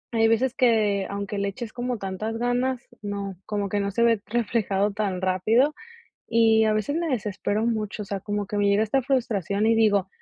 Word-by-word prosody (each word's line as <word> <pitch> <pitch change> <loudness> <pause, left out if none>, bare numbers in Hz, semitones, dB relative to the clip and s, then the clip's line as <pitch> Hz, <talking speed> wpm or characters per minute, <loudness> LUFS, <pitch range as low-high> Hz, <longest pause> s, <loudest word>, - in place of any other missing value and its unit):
hay 225 0 +4
veces 235 +3 +2
que, 215 -6 +2
aunque 200 0 -4
le 200 - 0
eches 225 +1 -7
como 245 0 -3
tantas 205 +3 -4
ganas, 245 +1 -1
no, 200 -2 -4
como 205 -1 -1
que 205 +1 -1
no 200 0 -1
se 235 +4 +1
ve 230 -3 +3
reflejado 210 -3 0
tan 200 -3 -2
rápido 215 +10 +2 0.5
y 225 -1 +4
a 215 - +2
veces 215 +8 -1
me 335 -1 -1
desespero 210 -2 -1
mucho, 215 -2 -2
o - - -6
sea, 200 -1 -4
como 205 0 -3
que 205 - -4
me 205 0 +2
llega 200 +1 +3
esta 240 +5 +1
frustración 220 - 0
y 225 - +4
digo: 205 -4 +3
215 Hz, 200 wpm, -25 LUFS, 200-235 Hz, 0.5 s, hay